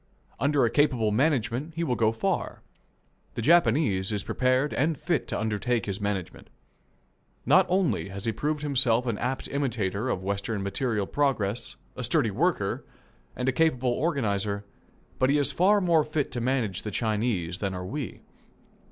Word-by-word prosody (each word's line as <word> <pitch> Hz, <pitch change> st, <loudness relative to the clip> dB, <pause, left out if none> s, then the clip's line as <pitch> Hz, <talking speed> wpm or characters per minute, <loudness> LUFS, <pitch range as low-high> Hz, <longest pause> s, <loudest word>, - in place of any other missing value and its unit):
Under 140 Hz, -2 st, +3 dB
a 115 Hz, -, 0 dB
capable 125 Hz, -7 st, +2 dB
management 130 Hz, +3 st, 0 dB
he 170 Hz, -, -1 dB
will 130 Hz, -, 0 dB
go 110 Hz, -2 st, +2 dB
far. 115 Hz, -, -2 dB, 0.7 s
The -, -, -2 dB
Japanese 115 Hz, -, +3 dB
is 105 Hz, -2 st, -1 dB
prepared 130 Hz, +3 st, +1 dB
and 155 Hz, +2 st, +1 dB
fit 170 Hz, -3 st, -1 dB
to -, -, -2 dB
undertake 110 Hz, +1 st, -1 dB
this 100 Hz, 0 st, -4 dB
management. 95 Hz, -3 st, -4 dB, 1.0 s
Not -, -, +5 dB
only 180 Hz, -, +1 dB
has 100 Hz, +1 st, -5 dB
he 115 Hz, -, +2 dB
proved 150 Hz, +5 st, -2 dB
himself 125 Hz, -4 st, +2 dB
an 115 Hz, -4 st, -2 dB
apt 130 Hz, +2 st, -2 dB
imitator 120 Hz, -5 st, -1 dB
of 95 Hz, -, -2 dB
Western 100 Hz, +1 st, -2 dB
material 105 Hz, +1 st, -1 dB
progress, 120 Hz, -5 st, -1 dB, 0.2 s
a 125 Hz, -, -5 dB
sturdy 115 Hz, -2 st, +2 dB
worker, 125 Hz, -, 0 dB, 0.5 s
and 125 Hz, -, -3 dB
a -, -, +4 dB
capable 130 Hz, -3 st, +2 dB
organizer, 105 Hz, -, -1 dB, 0.5 s
but 130 Hz, -, +3 dB
he 145 Hz, -, +4 dB
is 145 Hz, -, +1 dB
far 200 Hz, +4 st, +4 dB
more 170 Hz, -5 st, +3 dB
fit 155 Hz, -2 st, -2 dB
to 125 Hz, -2 st, -3 dB
manage 120 Hz, -7 st, 0 dB
the 105 Hz, -, -5 dB
Chinese 105 Hz, -5 st, -1 dB
than 100 Hz, -2 st, -2 dB
are 90 Hz, 0 st, -5 dB
we. 135 Hz, +5 st, -5 dB
120 Hz, 160 wpm, -27 LUFS, 105-145 Hz, 1.0 s, Not